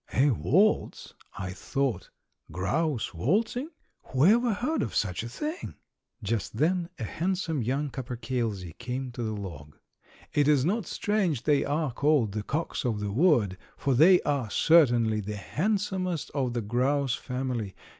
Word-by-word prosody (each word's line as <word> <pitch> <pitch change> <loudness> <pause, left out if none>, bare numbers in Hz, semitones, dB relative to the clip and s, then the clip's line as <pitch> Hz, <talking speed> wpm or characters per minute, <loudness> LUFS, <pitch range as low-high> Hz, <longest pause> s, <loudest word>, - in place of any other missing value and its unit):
"A 140 +2 +4
waltz," 190 - +1 0.2
I 95 -2 -4
thought; 125 +3 -2 0.4
"grouse 110 - -1
waltzing; 220 - 0 0.4
whoever 215 - +4
heard 250 +10 -1
of 105 - -3
such 90 -4 0
a 115 - -6
thing?" 300 - -5 0.5
Just 110 0 -2
then 170 +4 +1
a - - -5
handsome 170 - -1
young 135 +5 -1
capercailzie 115 -8 -4
came 125 +1 -4
to 120 - -6
the 110 -2 -3
log. 75 -7 -9 0.6
It 145 -1 +3
is 145 -3 +4
not 200 +1 0
strange 190 - 0
they 145 0 +3
are 150 -2 -1
called 140 -4 +2
the 105 +1 -3
"cocks 155 +11 -3
of 115 -5 -1
the 105 -1 -3
wood," 115 - +3 0.2
for 140 - 0
they 175 +8 +7
are 140 -6 -1
certainly 120 -8 +4
the 105 +1 -5
handsomest 185 - -1
of 130 -4 -1
the 120 - -1
grouse 130 +5 +1
family. 125 -6 -3
130 Hz, 145 wpm, -28 LUFS, 110-165 Hz, 0.6 s, they